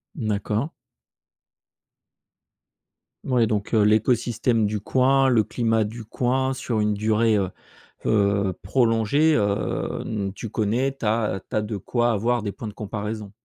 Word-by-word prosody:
D'accord. 110 +1 -1 2.5
Ouais, 125 -3 +2
donc 105 +1 -2
heu, 110 - +5
l'écosystème 115 +1 +2
du 105 0 -2
coin, 135 +4 +3
le 115 -4 +4
climat 115 -1 0
du 110 +2 -7
coin, 130 +4 0
sur 120 -3 -2
une 105 0 +1
durée, 110 +1 +2
heu, 95 -2 0 0.6
heu, 100 -2 +2
prolongée, 115 +7 +2
heu, 100 -1 -1
n 100 -3 -3
tu 115 +2 -7
connais, 120 +6 0
tu 125 - -6
as 105 -3 0
tu - - -5
as 110 - +2
de 105 0 -4
quoi 120 +5 0
avoir 115 +2 0
des 100 - -2
points 110 - -8
de 105 - -7
comparaison. 105 -1 -5
110 Hz, 145 wpm, -24 LUFS, 105-120 Hz, 2.5 s, heu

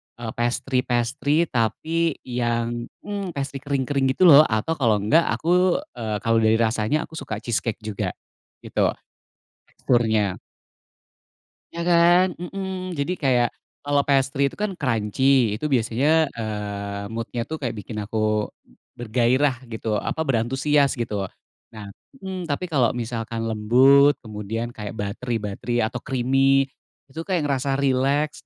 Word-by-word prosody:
eee, 115 -1 -6
pastry-pastry, 125 +5 0
tapi 160 +8 0
yang 120 -1 -2 0.2
mmm, 200 -4 -5
pastry 140 0 -4
kering-kering 140 0 0
gitu - - +2
loh 155 -3 +8
atau 110 +8 -1
kalau 115 -4 +3
enggak 160 +11 +3
aku, 180 +2 +2 0.2
eee, 110 -2 -2
kalau 115 0 +3
dari 110 0 +4
rasanya 115 +5 +1
aku 160 - -8
suka 110 -6 -6
cheese 120 -3 0
cake 115 -1 -5
juga 105 -2 -3 0.5
gitu, - - 0 0.8
teksturnya. 110 -6 +1 1.4
Ya, 170 - -4
kan? 175 +2 +5
Mmm. 185 +1 -5
Jadi 140 +6 0
kayak, 125 -5 +2 0.3
kalau 145 0 +1
pastry 135 0 +2
itu 140 - -2
kan 205 -3 -3
crunchy, 125 - +2
itu 150 - -5
biasanya, 120 +3 +1 0.3
eee, 100 -2 -4
mood-nya 115 +1 -4
tuh 160 - -3
kayak 120 - -2
bikin 105 +2 -8
aku 110 0 0 0.5
bergairah 130 +3 +1
gitu, 110 -2 -3
apa 160 - -3
berantusias 135 +2 +1
gitu. 105 -5 -3 0.5
Nah 105 -2 -9 0.3
mmm, 190 -2 -5
tapi 165 +3 -3
kalau 130 -7 +2
misalkan 115 -1 -4
lembut 130 +7 +5
kemudian 110 +2 -5
kayak 105 -3 -7
buttery-buttery 110 +2 -3
atau 110 +3 -1
creamy 135 +2 +2 0.4
itu 160 +5 -7
kayak 185 -4 0
ngerasa 135 0 0
rileks, 140 +3 0
125 Hz, 130 wpm, -23 LUFS, 110-145 Hz, 1.4 s, loh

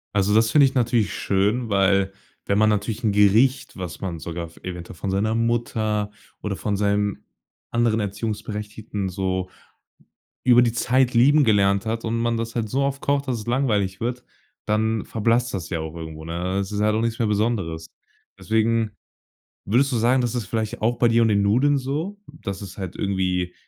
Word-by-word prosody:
Also, 100 +1 +2
das 110 +1 +4
finde 145 +2 +6
ich 135 - +1
natürlich 120 -4 +1
schön, 105 +5 0
weil 100 -1 +2 0.3
wenn 100 - +1
man 110 0 +4
natürlich 105 +3 -1
'n 110 - +2
Gericht, 105 +7 +3
was 90 -3 -6
man 90 -4 -4
sogar 85 +1 -5
f 80 - -16
eventuell 90 -1 -7
von 95 +3 -3
seiner 110 +3 0
Mutter 110 -3 0 0.3
oder 105 -2 -3
von 100 +1 -2
seinem 100 0 0 0.5
anderen 115 -1 +2
Erziehungsberechtigten 105 -1 -4
so 95 -1 -2 1.0
über 125 -1 +6
die 115 -2 +2
Zeit 125 +1 +2
lieben 145 +5 +5
gelernt 100 -2 +3
hat 115 +1 -2
und 115 0 -1
man 115 0 0
das 115 0 -4
halt 115 -2 -1
so 135 +5 0
oft 140 0 -1
kocht, 140 0 0
dass 125 -2 0
es 105 - -10
langweilig 105 -7 0
wird, 120 +1 -3 0.4
dann 110 +1 0
verblasst 115 +2 +1
das 85 -6 -4
ja 85 - -2
auch 80 0 -6
irgendwo, 80 -1 -8
ne? 90 +3 -2
Es 100 +1 -2
ist 105 - -2
halt 105 0 +2
auch 110 - +1
nichts 115 0 -1
mehr 115 -3 +1
Besonderes. 100 -7 -1 0.5
Deswegen 110 0 +1 0.7
würdest 130 +7 +2
du 125 - 0
sagen, 125 +3 +3
das 120 0 -1
ist 115 -5 -2
vielleicht 110 +1 -3
auch 115 +2 +1
bei 120 - +4
dir 115 0 +3
und 115 - +4
den 100 -1 +3
Nudeln 125 +8 +3
so, 150 +10 -3 0.3
dass 100 0 -4
es 95 -2 -9
halt 95 -3 -5
irgendwie 90 -2 -1
110 Hz, 190 wpm, -23 LUFS, 100-120 Hz, 1.0 s, finde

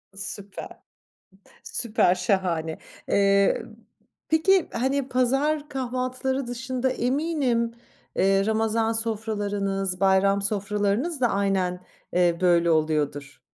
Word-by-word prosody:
Süper. 195 0 -8 0.8
Süper 215 -6 +1
şahane. 175 -5 -1 0.3
Eee, 200 0 +3 0.7
peki, 350 +4 +3
hani, 265 +2 0
pazar 275 +4 +1
kahvaltıları 255 0 -2
dışında 255 +1 -2
eminim, 255 -3 0 0.4
eee, 195 +1 +3
Ramazan 220 +1 +1
sofralarınız, 205 -4 -2
bayram 195 +1 +3
sofralarınız 210 - -1
da 245 - +4
aynen, 195 -3 0 0.3
eee, 175 -1 +3
böyle 170 -2 +4
oluyordur. 145 -3 -1
210 Hz, 90 wpm, -25 LUFS, 190-255 Hz, 0.8 s, da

